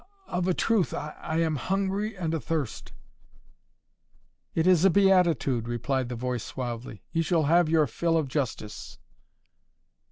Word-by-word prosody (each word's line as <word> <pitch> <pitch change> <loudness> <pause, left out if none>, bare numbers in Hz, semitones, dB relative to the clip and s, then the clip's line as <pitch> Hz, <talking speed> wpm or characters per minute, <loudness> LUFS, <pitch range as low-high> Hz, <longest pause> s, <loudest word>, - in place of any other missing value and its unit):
"Of 180 0 -2
a 185 - +2
truth, 220 -6 +1
I 150 - -5 0.3
am 160 -2 +1
hungry 195 - -1
and 165 -3 -2
a 165 - 0
thirst." 150 -6 -3 1.6
"It 160 - +2
is 180 -2 +5
a 195 - +7
beatitude," 170 - +3
replied 120 +2 -1
the 125 - -4
voice 125 -1 -3
suavely. 120 -5 -6
"You 165 - +1
shall 165 0 +1
have 165 +2 +4
your 160 -1 +4
fill 165 +2 0
of 155 -3 0
justice." 130 -6 -4
160 Hz, 140 wpm, -27 LUFS, 130-180 Hz, 1.6 s, a